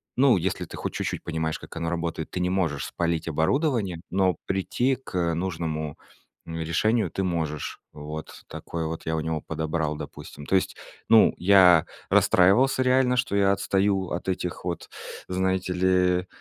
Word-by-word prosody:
ну, 130 Hz, -4 st, +5 dB
если 90 Hz, +1 st, -2 dB
ты -, -, -10 dB
хоть -, -, -4 dB
чуть-чуть -, -, -3 dB
понимаешь, 80 Hz, -1 st, -2 dB
как -, -, -12 dB
оно 85 Hz, 0 st, -2 dB
работает, 85 Hz, -2 st, -3 dB
ты 90 Hz, -, -4 dB
не 90 Hz, 0 st, 0 dB
можешь 85 Hz, -7 st, 0 dB
спалить 85 Hz, -2 st, -2 dB
оборудование, 100 Hz, -, 0 dB
но 95 Hz, -2 st, +2 dB
прийти 120 Hz, +7 st, 0 dB
к, 130 Hz, -7 st, -12 dB
э, 85 Hz, -1 st, +1 dB
нужному 80 Hz, -4 st, -3 dB, 0.5 s
решению 85 Hz, +8 st, 0 dB
ты 95 Hz, -, -3 dB
можешь. 80 Hz, -5 st, -3 dB
Вот 75 Hz, +1 st, -8 dB
такой 80 Hz, -1 st, -5 dB
вот 80 Hz, +1 st, -5 dB
я 80 Hz, -, 0 dB
у 80 Hz, -, -1 dB
него 80 Hz, -1 st, -2 dB
подобрал, 80 Hz, -1 st, -2 dB
допустим 75 Hz, -1 st, -9 dB
То -, -, -4 dB
есть, 95 Hz, -, +1 dB, 0.3 s
ну, 115 Hz, -1 st, +6 dB
я 90 Hz, -3 st, +6 dB, 0.3 s
расстраивался 125 Hz, +9 st, +4 dB
реально, 125 Hz, 0 st, +3 dB
что 100 Hz, -, 0 dB
я 100 Hz, -1 st, +4 dB
отстаю 95 Hz, -1 st, 0 dB
от 85 Hz, +2 st, -4 dB
этих 90 Hz, -1 st, -3 dB
вот, 85 Hz, -3 st, -4 dB, 0.4 s
знаете 95 Hz, 0 st, 0 dB
ли, 90 Hz, 0 st, +2 dB
90 Hz, 160 wpm, -25 LUFS, 80-95 Hz, 0.5 s, ну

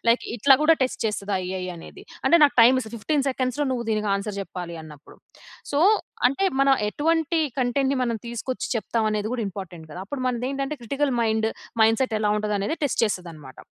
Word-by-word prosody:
Like 235 Hz, -, +4 dB
ఇట్లా 270 Hz, +5 st, +6 dB
కూడా 325 Hz, +1 st, +6 dB
test 255 Hz, -, -2 dB
చేస్తద 210 Hz, -1 st, -2 dB, 0.2 s
AI 185 Hz, -1 st, -3 dB
అనేది. 165 Hz, -, -12 dB, 0.2 s
అంటే 340 Hz, -, +6 dB
నాకు 290 Hz, -, +5 dB
టైమ్‌ 255 Hz, +3 st, +6 dB
ఇస్తది. 225 Hz, -1 st, -8 dB
15 285 Hz, +5 st, 0 dB
సెకండ్స్‌లో 260 Hz, +2 st, -1 dB
నువ్వు 240 Hz, -2 st, -2 dB
దీనికి 215 Hz, -1 st, 0 dB
ఆన్సర్ 200 Hz, +1 st, -4 dB
చెప్పాలి 175 Hz, -3 st, -7 dB
అన్నప్పుడు. 150 Hz, -2 st, -14 dB, 0.6 s
సో, 285 Hz, -, +2 dB, 0.5 s
అంటే 275 Hz, +10 st, -1 dB, 0.2 s
మనం 275 Hz, 0 st, +5 dB
ఎటువంటి 325 Hz, +5 st, +1 dB, 0.2 s
కంటెంట్‌ని 265 Hz, +2 st, +1 dB
మనం 235 Hz, -2 st, 0 dB
తీసుకొచ్చి, 235 Hz, +2 st, -4 dB
చెప్తాం 225 Hz, +1 st, -1 dB
అనేది 210 Hz, 0 st, -1 dB
కూడా 230 Hz, -3 st, -2 dB
ఇంపార్టెంట్ 175 Hz, -4 st, -9 dB
కదా! 180 Hz, -, -7 dB
అప్పుడు 265 Hz, +2 st, -5 dB
మనదేంటంటే 270 Hz, +4 st, -2 dB
క్రిటికల్ 275 Hz, +3 st, -1 dB
మైండ్ 220 Hz, 0 st, +1 dB, 0.3 s
మైండ్ 225 Hz, +2 st, +4 dB
సెట్ 240 Hz, -4 st, -1 dB
ఎలా 210 Hz, -1 st, +1 dB
ఉంటది 210 Hz, -1 st, -1 dB
అనేది 205 Hz, +11 st, -2 dB
టెస్ట్ 280 Hz, -, 0 dB
చేస్తది 180 Hz, -5 st, -2 dB
అన్నమాట. 135 Hz, -4 st, -13 dB
235 Hz, 185 wpm, -24 LUFS, 210-275 Hz, 0.6 s, ఇట్లా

